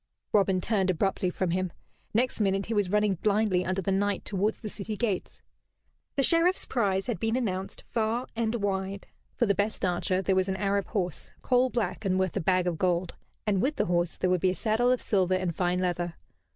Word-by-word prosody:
Robin 195 -2 +3
turned 195 0 +1
abruptly 185 +1 +1
from 180 0 -1
him. 185 0 -1 0.4
Next 245 +3 +1
minute 195 -1 +1
he 225 - -3
was 205 -4 +1
running 210 -3 +2
blindly 205 -3 +2
under 185 +1 -1
the 195 - 0
night 200 +1 0
towards 205 +2 0
the 220 - -6
city 210 +1 -4
gates. 210 -5 -2 0.7
The 275 - +2
Sheriff's 340 +5 +3
prize 195 -6 0
had 240 -3 -2
been 225 +1 0
announced 195 -6 -3
far 230 +2 0
and 225 0 0
wide. 195 -2 -2 0.3
For 235 - +2
the 200 - +3
best 205 +1 -1
archer 185 +1 0
there 190 - +2
was 190 +1 +1
an 190 - 0
Arab 200 0 0
horse, 180 -6 -2
coal 255 0 +3
black 220 -7 -2
and 185 -2 +1
worth 190 -2 0
a - - +1
bag 185 +2 +2
of 175 -3 -1
gold, 180 -1 +1 0.3
and 200 -3 +2
with 285 +6 +1
the - - +1
horse 175 -2 0
there 185 - +1
would 180 -2 +2
be 185 - +3
a 185 - -1
saddle 230 +4 +2
of 255 - +1
silver 185 -3 +2
and 185 -3 -1
fine 180 0 +1
leather. 175 -2 -1
195 Hz, 210 wpm, -28 LUFS, 185-220 Hz, 0.7 s, Robin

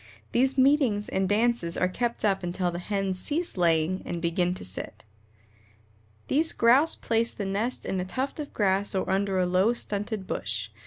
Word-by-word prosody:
These 265 +3 +2
meetings 260 -6 +3
and 190 0 0
dances 215 -5 +1
are 185 - +2
kept 235 +4 -1
up 195 -2 +1
until 175 0 -1
the 175 - -5
hens 195 0 -2
cease 330 - -1
laying 170 0 +1
and 175 - -4
begin 175 +1 0
to - - -4
sit." 100 +4 -6 1.2
These 315 +4 +1
Grouse 265 +8 +4
place 230 0 0
the 200 - -4
nest 210 +6 -2
in 190 - -2
a 180 - -2
tuft 265 +10 -3
of 295 - -5
grass 195 -1 0
or 190 - -1
under 195 0 0
a 185 - +2
low, 185 +6 +2
stunted 210 -2 -3
bush. 105 - -3
195 Hz, 175 wpm, -27 LUFS, 180-235 Hz, 1.2 s, Grouse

